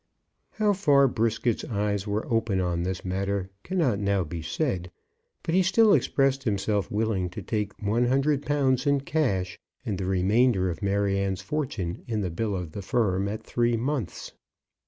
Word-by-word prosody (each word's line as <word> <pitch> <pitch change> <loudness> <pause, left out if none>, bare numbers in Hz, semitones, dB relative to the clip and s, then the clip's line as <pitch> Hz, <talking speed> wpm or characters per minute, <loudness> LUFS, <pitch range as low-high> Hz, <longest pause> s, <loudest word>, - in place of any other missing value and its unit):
How 210 -1 +2
far 145 -8 +4
Brisket's 115 -1 0
eyes 105 -2 -1
were 105 +2 -1
open 115 -4 +1
on 90 -2 0
this 90 0 -3
matter 95 +1 -2
cannot 155 - 0
now 100 -2 +1
be 85 +1 -6
said; 90 - -2 0.5
but 165 - -2
he 190 - +5
still 200 +3 +5
expressed 135 -1 +2
himself 100 -3 0
willing 105 -4 0
to 90 - -7
take 105 -2 -3
one 110 +4 +1
hundred 135 +2 +2
pounds 135 -2 +1
in 140 -1 +3
cash, 110 - -1 0.3
and 100 -4 -2
the 95 - -2
remainder 95 +1 +2
of 80 - -8
Maryanne's 100 -1 0
fortune 110 - -3
in 110 -3 -1
the 90 -3 -2
bill 105 +3 -2
of 90 -4 -5
the 100 - -6
firm 100 -2 0
at 105 +2 -4
three 120 -1 +1
months. 125 - -3
105 Hz, 165 wpm, -26 LUFS, 95-130 Hz, 0.5 s, he